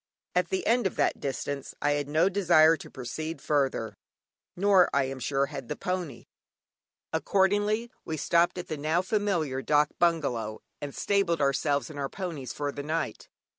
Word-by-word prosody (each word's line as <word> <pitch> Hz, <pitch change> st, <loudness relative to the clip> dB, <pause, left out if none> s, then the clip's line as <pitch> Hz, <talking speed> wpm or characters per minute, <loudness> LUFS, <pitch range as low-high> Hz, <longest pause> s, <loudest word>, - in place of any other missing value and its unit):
At 180 Hz, -1 st, +1 dB
the 190 Hz, -, -1 dB
end 235 Hz, -2 st, +3 dB
of -, -, -6 dB
that -, -, +1 dB
distance 140 Hz, 0 st, -4 dB
I 145 Hz, -, +1 dB
had 145 Hz, -1 st, 0 dB
no 160 Hz, +4 st, +3 dB
desire 170 Hz, -5 st, +5 dB
to 155 Hz, -, -11 dB
proceed 155 Hz, +6 st, -5 dB
further, 135 Hz, -6 st, 0 dB, 0.6 s
nor, 190 Hz, -1 st, +5 dB
I 140 Hz, -, +4 dB
am 135 Hz, 0 st, -4 dB
sure, 135 Hz, +2 st, +1 dB
had 140 Hz, -3 st, -7 dB
the 150 Hz, -, -3 dB
pony. 180 Hz, -9 st, -4 dB, 0.9 s
Accordingly, 205 Hz, +4 st, +1 dB
we 160 Hz, -, -4 dB
stopped 170 Hz, +4 st, +2 dB
at 180 Hz, -, -5 dB
the 155 Hz, -, -4 dB
now 155 Hz, +5 st, +1 dB
familiar 185 Hz, -10 st, 0 dB
dâk 150 Hz, +3 st, +3 dB
bungalow, 135 Hz, -11 st, +1 dB, 0.2 s
and 145 Hz, -1 st, -6 dB
stabled 195 Hz, -5 st, +1 dB
ourselves 140 Hz, +1 st, +1 dB
and 145 Hz, -, -8 dB
our 135 Hz, -1 st, -2 dB
ponies 165 Hz, -, -5 dB
for 145 Hz, -1 st, -3 dB
the 145 Hz, -, -6 dB
night. 155 Hz, +3 st, -3 dB
155 Hz, 170 wpm, -28 LUFS, 140-180 Hz, 0.9 s, desire